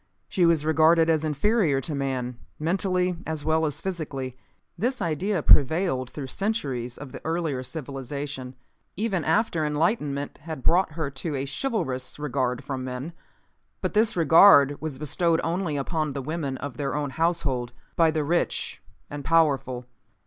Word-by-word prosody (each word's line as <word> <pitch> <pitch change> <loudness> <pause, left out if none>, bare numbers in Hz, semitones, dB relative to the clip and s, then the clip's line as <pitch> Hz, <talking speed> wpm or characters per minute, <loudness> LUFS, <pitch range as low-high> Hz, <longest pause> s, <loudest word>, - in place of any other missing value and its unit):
She 175 -2 +2
was 160 -3 +2
regarded 160 +1 +5
as 160 -1 +1
inferior 155 0 +2
to 150 +4 -3
man, 130 -3 -2 0.2
mentally 180 +2 0
as 160 -2 -3
well 160 0 +2
as 150 0 -3
physically. 140 -9 -4 0.4
This 245 +9 -1
idea 170 +2 -1
prevailed 140 -3 +4
through 140 +2 -6
centuries 130 - -2
of 140 -3 -9
the - - -8
earlier 160 -5 -1
civilization, 135 -1 -5 0.4
even 195 -4 -1
after 170 -2 +1
enlightenment 150 -2 -1
had 155 -4 -7
brought 180 +3 +4
to - - -17
her 155 -4 -3 0.2
a 135 - -2
chivalrous 135 - -2
regard 130 -4 -1
from 130 -2 -4
men. 130 +6 -5 0.7
But - - -2
this 215 -2 +3
regard 160 -3 +7
was 155 -4 -4
bestowed 165 +3 +1
only 165 -3 -1
upon 155 +1 -1
the 140 -1 -4
women 145 -2 -3
of 130 -2 -6
their 140 -1 -2
own 145 -2 -2
household, 135 -6 0 0.2
by 165 -1 +4
the 155 -1 0
rich 170 +4 -1 0.3
and 145 -1 -7
powerful. 135 -6 +2
150 Hz, 150 wpm, -26 LUFS, 135-170 Hz, 0.7 s, regard